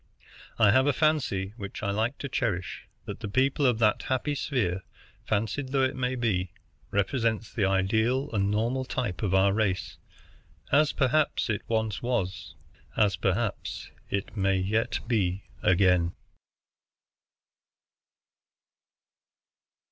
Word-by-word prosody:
I 105 -3 +6
have 130 +4 +4
a 145 - +3
fancy, 130 - +1
which 100 -1 -7
I 100 - 0
like 110 +6 -1
to 140 - -5
cherish, 105 -9 -2 0.2
that - - -6
the - - -5
people 135 +5 +2
of 120 -3 +2
that 110 -2 +3
happy 130 +3 -1
sphere, 110 -10 -1 0.5
fancied 110 +6 -1
though 135 0 +2
it 130 +1 0
may 130 0 -1
be, 100 -7 0 0.4
represent 110 +2 0
the 100 - +2
ideal 110 +8 +1
and 100 -2 +1
normal 115 +5 0
type 120 -8 -3
of 100 -3 +1
our 95 +1 +4
race, 100 -3 -1 0.7
as 150 +2 +4
perhaps 140 -2 +1
it 105 - -2
once 110 -2 -1
was, 120 -7 -2 0.4
as 100 -3 +3
perhaps 95 +4 -2 0.2
it 100 +2 -3
may 95 -2 +2
yet 105 +5 0
be 100 -5 0 0.2
again. 90 -2 +3
110 Hz, 125 wpm, -27 LUFS, 95-130 Hz, 0.7 s, I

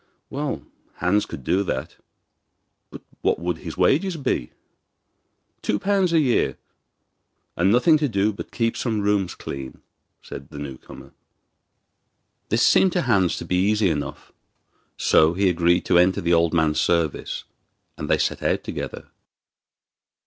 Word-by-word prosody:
Well, 145 0 -3 0.3
Hans 100 +4 +1
could 70 - -8
do 95 +9 +1
that; 65 -9 -4 0.9
but - - -11 0.2
what - - +1
would 85 -1 -3
his 85 -2 -8
wages 160 - +2
be? 135 - -2 1.1
'Two 105 - 0
pounds 195 - +1
a 165 - +4
year, 130 -6 +1 1.0
and 95 +3 +2
nothing 150 +7 +4
to 150 -2 0
do 105 0 +1
but - - -8
keep 115 -1 -1
some 110 -4 -1
rooms 100 -3 0
clean,' 65 -1 -7 0.4
said 70 0 -9
the - - -10
new 70 -3 -7
comer. - - -13 1.4
This 115 +3 +2
seemed 190 -2 +4
to 175 - +1
Hans 100 -8 +2
to - - -6
be 90 - 0
easy 100 0 +2
enough; 75 -2 -5 0.7
so 80 +2 +4
he 100 +1 +2
agreed 85 0 +2
to 90 - +4
enter 90 +1 +3
the 85 +1 +1
old 85 -1 +3
man's 80 -2 +2
service, 85 -4 -1 0.5
and - - -6
they - - +4
set - - -1
out - - 0
together. - - -6
95 Hz, 150 wpm, -23 LUFS, 85-120 Hz, 1.4 s, a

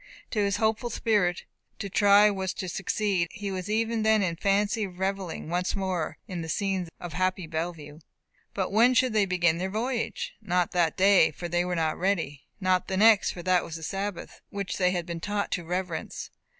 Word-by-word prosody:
To 215 - -1
his 200 -1 +1
hopeful 220 +2 0
spirit, 205 -6 +1 0.3
to 200 - -4
try 205 +2 +5
was 190 -2 -3
to 185 - -4
succeed; 195 0 0
and - - -12
he 200 -1 -3
was 185 +1 -4
even 225 +1 0
then 220 -1 +3
in 170 -3 -1
fancy 205 +3 +1
revelling 190 -2 -3
once 180 +2 -1
more 185 -5 -2
in 180 -4 -4
the 160 - -6
scenes 190 -1 -1
of 175 -2 -7
happy 185 0 0
Bellevue. 160 -2 -5 0.6
But 190 -2 -1
when 235 +5 +5
should 255 -2 +3
they 210 -2 +3
begin 175 -2 +2
their 190 +1 -2
voyage? 235 +4 -2
Not 180 -4 0
that 170 -3 +1
day, 190 -4 +6
for 175 +3 -6
they 175 +1 +1
were 180 0 -2
not 160 -2 0
ready. 165 -7 -1 0.2
Not 185 -2 +1
the 190 - -2
next, 215 -1 +6
for 175 - -6
that 185 -1 +3
was 165 - -7
the 165 - -7
Sabbath, 195 +2 -5
which 200 -3 -4
they 180 -1 +4
had 175 -2 -2
been 170 -1 -5
taught 205 +3 -2
to 180 - -1
reverence. 180 0 -4
185 Hz, 200 wpm, -27 LUFS, 175-205 Hz, 0.6 s, day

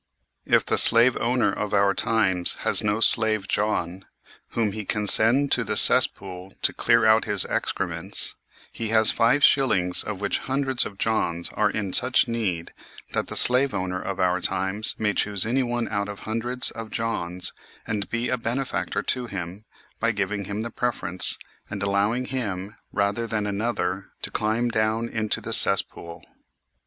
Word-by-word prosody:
If - - +2
the - - +2
slave 115 +2 +5
owner 120 +1 0
of 105 0 -3
our 100 0 +3
times 95 -6 0
has - - +4
no 105 +1 -1
slave 110 -4 +3
John, 95 -3 -2 0.5
whom 110 -3 0
he 110 +1 -5
can 105 +1 -3
send 125 +7 +3
to - - +2
the - - -1
cesspool 95 0 +3
to - - +1
clear 115 0 +2
out 110 0 +4
his 105 -3 +1
excrements, 90 +1 -1 0.4
he 115 - -4
has 110 -1 +6
five 125 +6 +1
shillings 90 -10 +4
of 105 -3 -6
which 100 - -2
hundreds 135 -1 0
of 100 - -14
Johns 85 -7 -2
are 105 - 0
in 100 -3 -4
such 125 +1 +3
need 100 -8 -3 0.4
that - - -2
the - - -5
slave 130 -1 +5
owner 90 -1 -3
of 95 -1 -5
our 90 0 0
times 95 +5 -1
may 105 -1 -1
choose 100 -2 +1
anyone 120 0 -1
out 100 -1 -3
of 100 - -9
hundreds 120 +3 -2
of 115 -1 -8
Johns 90 -7 -4 0.3
and 105 -2 -4
be 115 +1 -2
a 125 - -2
benefactor 125 +3 -3
to 125 -1 -3
him 95 0 -7 0.3
by 115 +1 0
giving 100 0 -3
him 105 +3 -5
the 115 +1 -5
preference, 95 -7 -2 0.3
and 100 -1 -5
allowing 100 +5 0
him, 105 -6 -5 0.2
rather 100 +3 -1
than 110 -2 -2
another, 100 -3 -3 0.2
to - - -5
climb 110 +3 -1
down 110 +1 -1
into 110 -2 -3
the - - -5
cess - - +6
pool. 85 0 -13
105 Hz, 170 wpm, -23 LUFS, 95-115 Hz, 0.5 s, has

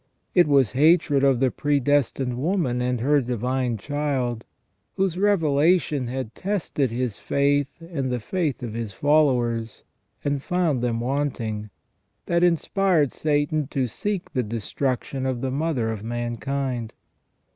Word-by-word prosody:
It 175 -3 +5
was 135 -6 +4
hatred 150 0 +4
of 135 -3 +4
the 130 -1 +2
predestined 140 -3 +1
woman 145 -6 0
and 125 -1 -1
her 145 +3 +3
Divine 125 0 -1
Child, 135 -3 -2 0.5
whose 190 -3 0
revelation 165 -6 +2
had 125 -2 -4
tested 185 -9 -1
his 120 -2 -3
faith 140 0 +1
and 155 -6 -3
the 125 - -1
faith 150 - -2
of 115 -3 -4
his 115 -3 -4
followers, 120 -4 +1 0.4
and 145 -1 0
found 165 -6 0
them 115 -2 -1
wanting, 120 -5 -2 0.6
that 170 0 +1
inspired 175 -3 +2
Satan 150 -1 0
to 135 -2 -1
seek 195 - -3
the 125 - +1
destruc 115 +4 -2
tion 135 -1 -4
of 125 -2 -2
the 135 -1 -1
mother 135 -6 0
of 110 -2 -5
mankind. 120 +1 -3
135 Hz, 135 wpm, -24 LUFS, 120-150 Hz, 0.6 s, It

